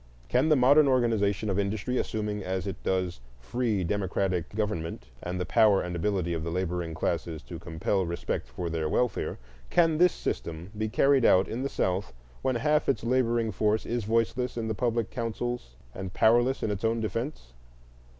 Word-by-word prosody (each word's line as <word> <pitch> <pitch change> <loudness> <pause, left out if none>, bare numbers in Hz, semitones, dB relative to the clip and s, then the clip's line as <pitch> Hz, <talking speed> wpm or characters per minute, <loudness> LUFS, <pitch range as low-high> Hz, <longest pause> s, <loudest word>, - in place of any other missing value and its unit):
Can 130 +6 +3
the 155 - +6
modern 140 +3 +6
organization 110 -5 +2
of 100 -1 0
industry, 105 +5 -1
assuming 105 -2 -2
as 95 +1 -2
it 100 - -5
does 90 -6 -1 0.2
free 110 - -1
democratic 95 -2 -1
government 85 - -2 0.2
and 90 +1 -4
the 90 - -1
power 110 -4 +4
and 90 0 -4
ability 90 -1 0
of 80 -1 -3
the 85 - -3
laboring 90 -1 -2
classes 80 -1 -2
to 85 - -8
compel 85 +3 -1
respect 85 -7 -3
for - - -5
their 80 -2 -1
welfare,—can 95 - 0
this 180 0 +6
system 85 +4 -4
be 110 +1 -2
carried 135 +3 +4
out 95 -3 +5
in 120 - -4
the 140 - -1
South 95 -3 -1 0.3
when 130 - 0
half 150 +4 +2
its 115 -5 +1
laboring 120 -2 +1
force 105 +2 +1
is 120 -1 -2
voiceless 115 +3 0
in 115 -1 -2
the 110 - -1
public 115 0 -1
councils 115 - -4 0.2
and 95 -1 -6
powerless 120 +4 +3
in 105 - 0
its 100 0 -4
own 115 +1 +1
defence? 110 - -4
105 Hz, 175 wpm, -28 LUFS, 90-120 Hz, 0.3 s, the